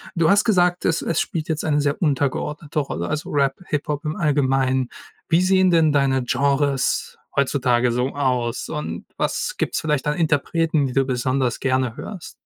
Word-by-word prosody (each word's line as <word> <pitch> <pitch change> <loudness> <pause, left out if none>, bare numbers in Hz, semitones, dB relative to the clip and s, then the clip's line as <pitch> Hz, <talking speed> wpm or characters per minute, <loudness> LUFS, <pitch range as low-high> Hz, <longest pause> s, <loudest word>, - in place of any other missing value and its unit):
Du 165 -1 +3
hast 205 +1 +5
gesagt, 180 -5 +2
es 165 - +1
es 165 - -1
spielt 160 -2 -3
jetzt 160 0 -2
eine 150 -2 +2
sehr 145 0 -1
untergeordnete 150 0 -1
Rolle, 85 - -3
also 155 - -3
Rap, 140 -2 +1
Hip-Hop 145 0 -2
im 150 - -2
Allgemeinen. 135 -4 +1 0.4
Wie 165 +2 +4
sehen 185 0 +4
denn 165 -2 +4
deine 135 -2 +2
Genres 140 +1 0 0.2
heutzutage 125 -3 +2
so 125 +2 0
aus? 125 -4 -1
Und 150 -1 -5
was - - -1
gibt's - - -1
vielleicht 150 -4 -1
an 150 +2 0
Interpreten, 160 -1 +1
die 125 - -5
du 135 - +3
besonders 130 0 -1
gerne 130 -3 0
hörst? 190 -6 -8
145 Hz, 170 wpm, -22 LUFS, 130-160 Hz, 0.4 s, hast